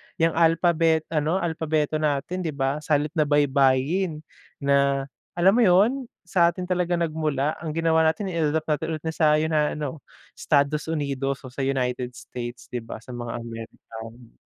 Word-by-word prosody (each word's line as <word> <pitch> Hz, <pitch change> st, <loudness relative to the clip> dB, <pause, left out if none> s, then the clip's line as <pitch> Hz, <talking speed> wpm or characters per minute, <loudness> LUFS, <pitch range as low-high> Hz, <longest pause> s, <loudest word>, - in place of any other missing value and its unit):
yang 165 Hz, 0 st, +2 dB
alphabet, 165 Hz, -1 st, +3 dB
ano 155 Hz, +2 st, +1 dB
alphabeto 155 Hz, -2 st, 0 dB
natin 150 Hz, +4 st, -1 dB
'di 160 Hz, -5 st, -3 dB
ba, 135 Hz, +2 st, 0 dB
salit 150 Hz, 0 st, 0 dB
na 150 Hz, -, +3 dB
baybayin, 145 Hz, +4 st, +2 dB, 0.4 s
na, 140 Hz, -1 st, +3 dB, 0.3 s
alam 175 Hz, +2 st, +5 dB
mo 245 Hz, -, +4 dB
yun, 220 Hz, +8 st, +3 dB, 0.2 s
sa 175 Hz, -1 st, +3 dB
atin 185 Hz, -, -5 dB
talaga 180 Hz, -1 st, +1 dB
nagmula 155 Hz, -4 st, -1 dB
ang 155 Hz, -2 st, -4 dB
ginawa 160 Hz, -1 st, +3 dB
natin 185 Hz, +4 st, -1 dB
in-adapt 160 Hz, -1 st, 0 dB, 0.2 s
natin 160 Hz, 0 st, -3 dB
sa 155 Hz, -2 st, +3 dB
'yo, 155 Hz, +1 st, 0 dB
na 150 Hz, -1 st, +1 dB
ano, 150 Hz, 0 st, -4 dB, 0.4 s
Estados 150 Hz, +1 st, +1 dB
Unidos 140 Hz, -3 st, -2 dB
o 130 Hz, -, -9 dB
sa 130 Hz, -, -11 dB
United 125 Hz, -2 st, -1 dB
States, 120 Hz, 0 st, -8 dB
'di 125 Hz, -, -2 dB
ba, 115 Hz, -, -8 dB
sa 125 Hz, -, -11 dB
mga 120 Hz, -1 st, -5 dB
American. 115 Hz, 0 st, -10 dB
150 Hz, 155 wpm, -24 LUFS, 135-165 Hz, 0.4 s, alam